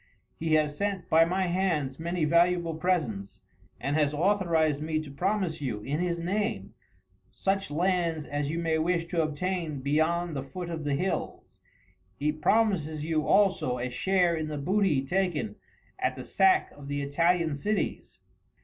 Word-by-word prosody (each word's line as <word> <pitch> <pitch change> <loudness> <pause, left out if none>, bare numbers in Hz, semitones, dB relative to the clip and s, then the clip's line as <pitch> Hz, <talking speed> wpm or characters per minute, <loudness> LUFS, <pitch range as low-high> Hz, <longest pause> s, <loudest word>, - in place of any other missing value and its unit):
He 160 -1 +1
has 150 -1 +1
sent 200 +1 -2
by 165 +1 +6
my 185 +3 0
hands 170 -7 0
many 170 0 -1
valuable 170 +1 +3
presents, 155 - -2 0.4
and 140 +1 -1
has 150 -1 +2
authorized 165 -4 +2
me 155 0 -1
to 155 -3 -7
promise 185 +1 -1
you, 115 -7 -3
in 140 +7 -2
his 175 -1 0
name, 205 +6 -2 0.6
such 195 -2 -1
lands 170 -1 0
as 145 0 -2
you 165 - -2
may 165 -1 0
wish 170 +1 +1
to 170 -2 +1
obtain 160 0 -2
beyond 160 +4 0
the 135 - -2
foot 170 +6 -6
of 160 -2 -5
the 145 -1 +1
hills. 185 +7 -3 0.6
He 150 +1 +1
promises 155 -3 +1
you, 155 -1 0
also, 190 -11 +3
a 125 +1 -3
share 180 +4 +2
in 160 -1 -3
the 150 -1 -4
booty 155 -3 +1
taken 185 +2 -1 0.4
at - - 0
the - - -7
sack 380 0 +3
of 145 -1 -12
the 145 0 -2
Italian 165 +3 +2
cities." 210 +9 -3
165 Hz, 160 wpm, -28 LUFS, 150-180 Hz, 0.6 s, by